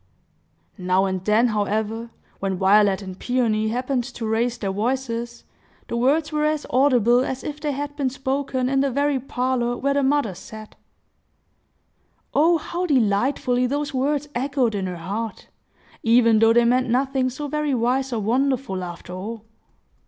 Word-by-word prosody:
Now 185 +1 +2
and 190 -1 -2
then, 215 +4 +3
however, 215 +2 -2 0.3
when 190 -1 -2
Violet 200 +1 +4
and 185 -1 -8
Peony 230 -4 0
happened 250 +2 -1
to 245 -3 -6
raise 230 +2 0
their 200 -4 -2
voices, 235 +2 -3 0.5
the - - -2
words 290 +6 +2
were 300 0 0
as 305 -1 0
audible 250 -2 +4
as 265 0 -4
if 295 0 -5
they 295 -1 -2
had 290 +1 -5
been 275 -3 0
spoken 270 -1 -2
in 270 +1 +1
the 275 - +1
very 280 +1 +1
parlor 250 -1 -1
where 280 +1 0
the 280 - +1
mother 275 -6 +1
sat. 215 +4 -11 1.6
Oh 330 +3 +4
how 350 +3 -3
delightfully 250 0 +1
those 285 +2 -2
words 285 +2 0
echoed 260 -2 0
in 195 -2 -2
her 180 -1 -5
heart, 205 +6 -5 0.5
even 230 -1 +4
though 225 0 +5
they 240 0 +4
meant 250 +1 +2
nothing 260 +1 +1
so 290 +4 -5
very 300 -1 -1
wise 255 +3 0
or 230 -3 -1
wonderful, 245 -3 0
after 175 0 -8
all! 215 +4 -6
245 Hz, 160 wpm, -23 LUFS, 220-275 Hz, 1.6 s, though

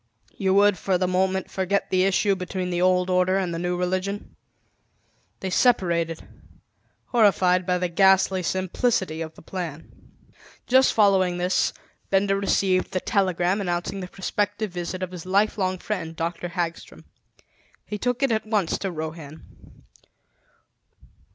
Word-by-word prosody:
You 190 -1 +1
would 205 -1 +4
for 190 -2 +1
the 185 0 0
moment, 190 +1 0
forget 190 +1 -1
the 185 0 +3
issue 195 +1 +2
between 185 0 -4
the 175 0 -1
old 180 0 +3
order 185 +1 +2
and 185 -3 -1
the 165 - -3
new 175 +1 -1
religion." 185 +3 -3 1.1
They 190 - -3
separated, 170 -9 +1 0.8
horrified 185 -5 +3
by 180 0 +2
the 180 0 -1
ghastly 190 +1 +3
simplicity 185 -1 -1
of 160 -1 -6
the - - -15
plan. 165 -4 -6 0.7
Just 260 +1 +4
following 190 -4 +3
this, 180 +1 +1 0.4
Benda 195 0 +2
received 195 -1 +1
the 185 - +1
telegram 185 -1 0
announcing 175 +1 -2
the 185 - -5
prospective 205 +2 -2
visit 180 +1 -4
of 185 - -4
his 180 -1 -9
lifelong 190 -1 +1
friend, 175 -5 -4
Dr. 170 +2 -3
Hagstrom. 170 -1 -5 0.8
He 210 - -5
took 245 +3 -1
it 270 - +2
at 220 -1 -1
once 210 -6 0
to 195 - -2
Rohan. 155 -1 -9
185 Hz, 140 wpm, -24 LUFS, 175-195 Hz, 1.1 s, would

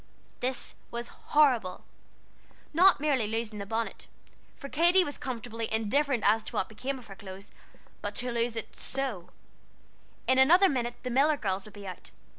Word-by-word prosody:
This 255 -1 -2 0.2
was 235 0 -5
horrible! 250 -11 +2 0.9
Not 365 +2 +6
merely 275 -7 +1
losing 220 -1 -3
the 200 - -5
bonnet, 225 +2 -3 0.5
for 280 - -7
Katy 345 +6 +4
was 290 -4 -4
comfortably 230 -3 -4
indifferent 235 +3 +1
as 220 +2 +4
to - - -7
what 185 - 0
became 260 +5 -4
of 250 - -12
her 195 - -10
clothes, 195 +1 -10 0.5
but - - -4
to 250 0 -2
lose 235 0 0
it 225 - -6
so. 255 -10 -3 1.0
In 260 0 +4
another 350 +9 +7
minute 240 -3 -1
the 250 - -3
Miller 290 +4 +4
girls 190 -5 -2
would 215 - -13
be 200 -1 -9
out. 185 -2 -8
240 Hz, 165 wpm, -29 LUFS, 215-275 Hz, 1.0 s, another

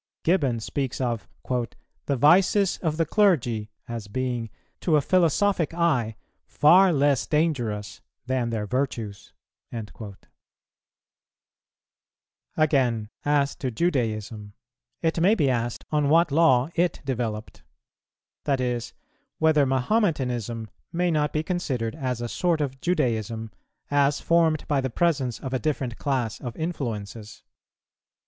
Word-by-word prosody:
Gibbon 145 -9 +2
speaks 130 +3 -3
of 120 -7 -2 0.2
"the 125 +3 -4
vices 180 - +4
of 155 -3 -1
the 165 - +2
clergy" 125 - +2 0.2
as 115 -3 -6
being 120 0 -2 0.3
"to 165 - +2
a - - +5
philosophic 175 +2 +2
eye 130 -11 +1 0.3
far 180 +5 +5
less 140 -3 +2
dangerous 120 -10 -1 0.2
than 125 -2 0
their 110 -2 -2
virtues."[184:1] 110 -3 -6 2.4
Again, 130 -8 +2
as 145 -1 +1
to 130 - -2
Judaism, 110 - -2 0.5
it 165 0 +1
may 200 +6 +5
be 140 -10 +2
asked 120 -1 -2
on 150 -2 +2
what 165 0 +4
law 140 -4 +4
it 175 +1 +1
developed; 115 -5 -3 0.8
that 135 -2 +1
is, 120 -2 -2 0.4
whether 155 -3 +3
Mahometanism 125 - 0 0.2
may 175 +1 +1
not 150 -2 +1
be 155 - -1
considered 135 -11 -2
as 130 -6 -3
a 120 - -2
sort 170 +6 0
of 135 -3 -3
Judaism, 115 - -1 0.4
as 145 0 +3
formed 165 -2 +2
by 145 -2 +1
the 130 - -2
presence 135 -4 0
of 130 -1 -6
a 130 - +1
different 130 -6 -2
class 130 -6 -1
of 120 -4 -6
influences. 115 -10 -5
135 Hz, 120 wpm, -25 LUFS, 115-160 Hz, 2.4 s, a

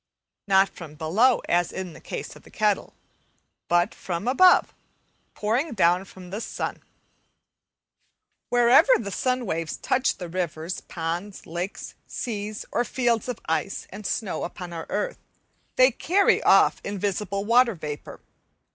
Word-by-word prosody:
Not 195 0 +5
from 155 -3 -11
below, 215 - +2
as 175 0 +2
in 185 -3 -6
the - - -13
case - - -6
of - - -14
the - - -17
kettle, - - 0 0.7
but 175 0 +2
from 180 +4 -4
above, 365 +9 +5 0.6
pouring 240 +9 0
down 180 -2 +3
from 180 -2 -13
the 205 +3 -4
sun. - - -4 1.7
Wherever 245 - +6
the 200 -3 -5
sun 255 +3 0
waves 165 -4 -3
touch 260 +1 0
the 180 - -6
rivers, 170 -1 -3
ponds, 175 +4 -4
lakes, 175 +4 -5
seas, 215 -2 -4
or 240 - +1
fields 240 -2 0
of 245 - -3
ice 165 +4 -2
and 205 +2 -8
snow 215 -5 -2
upon 175 0 -6
our 165 -1 -6
earth, - - -2 0.6
they 255 +1 +6
carry 380 +11 +2
off - - +5
invisible 200 0 -2
water 235 0 +4
vapour. 150 -3 -7
200 Hz, 140 wpm, -25 LUFS, 175-240 Hz, 1.7 s, Wherever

